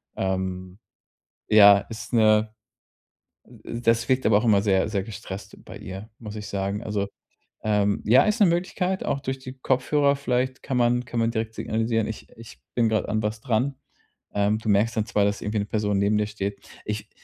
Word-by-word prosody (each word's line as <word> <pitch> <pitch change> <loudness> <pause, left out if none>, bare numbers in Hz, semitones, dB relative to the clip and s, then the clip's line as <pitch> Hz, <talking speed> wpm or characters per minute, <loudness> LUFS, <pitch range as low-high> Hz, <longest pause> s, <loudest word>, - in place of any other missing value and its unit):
Ähm, 95 0 -3 0.7
ja, 100 -2 +8
ist 115 +1 -8
'ne 110 -1 +4 0.9
d 120 0 -8
das 115 +1 +1
wirkt 130 0 +2
aber 105 -1 +5
auch 115 - -3
immer 105 -3 +4
sehr, 95 -1 +2
sehr 100 -3 -1
gestresst 100 -2 -9
bei - - -10
ihr, 95 +4 -8
muss 105 -2 -8
ich 105 -1 -6
sagen. 100 +2 -3
Also, 105 -2 -2 0.6
ähm 105 -1 +1
ja, 120 +5 +6
ist 215 +2 0
'ne 210 - +7
Möglichkeit, 180 +2 -1
auch 140 - -1
durch 135 0 -4
die 130 -1 -8
Kopfhörer 140 +2 +2
vielleicht 130 -1 -1
kann 130 - -2
man 120 0 +2
kann 120 0 -3
man 115 0 +1
direkt 110 -1 -3
signalisieren, 115 0 -1
ich 110 - -7
ich 115 0 -13 0.2
bin 115 -2 +3
grad 110 -1 0
an 110 +1 0
was 105 +1 -3
dran. 125 +3 0 0.6
Ähm, 105 +1 +1
du 110 - -4
merkst 105 +3 +2
dann 110 -1 0
zwar, 105 -3 +2
dass 100 0 -1
irgendwie 105 +1 -2
'ne 100 - -1
Person 105 -1 -1
neben 105 +1 +2
dir 105 - 0
steht. 100 -1 -4 0.3
Ich 105 0 -4
110 Hz, 190 wpm, -25 LUFS, 105-120 Hz, 0.9 s, ja